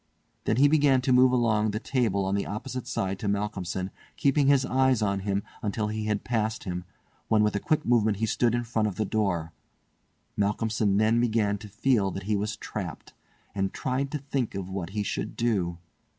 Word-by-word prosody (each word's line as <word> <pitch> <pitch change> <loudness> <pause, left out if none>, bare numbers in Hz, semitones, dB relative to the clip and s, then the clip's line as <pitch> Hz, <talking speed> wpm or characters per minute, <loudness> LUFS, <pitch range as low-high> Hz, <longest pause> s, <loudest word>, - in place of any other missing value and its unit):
Then 110 - +2
he 140 +4 +6
began 145 -3 +4
to 130 0 +2
move 125 0 +6
along 110 -4 +2
the 105 +1 -2
table 110 -7 0
on 95 - -1
the 100 - -1
opposite 120 +4 -5
side 95 -5 -2
to 105 - -3
Malcolmson 100 -2 -2 0.3
keeping 140 -1 +3
his 140 -2 +4
eyes 130 -3 +2
on 100 -1 0
him 100 0 -1 0.2
until 105 0 -1
he 110 0 -3
had 105 -1 -1
passed 110 -2 -1
him, 90 -3 -4 0.4
when 110 -1 +4
with 105 -1 +1
a - - +1
quick 155 +7 0
movement 110 -4 +3
he 110 - 0
stood 115 +2 +1
in 120 - 0
front 115 -2 0
of 100 - -4
the 110 - -1
door. 90 -7 -1 0.8
Malcolmson 105 0 +1
then 110 +2 +3
began 110 -4 +1
to 105 - -9
feel 110 -1 +1
that 95 0 -6
he 105 +2 0
was 105 +1 -2
trapped, - - -6 0.4
and 95 -1 -1
tried 135 +1 -1
to 150 - -2
think 135 -4 -3
of 95 -1 -5
what 95 -3 -4
he 105 - +1
should - - -3
do. 95 -8 0
110 Hz, 200 wpm, -27 LUFS, 100-120 Hz, 0.8 s, he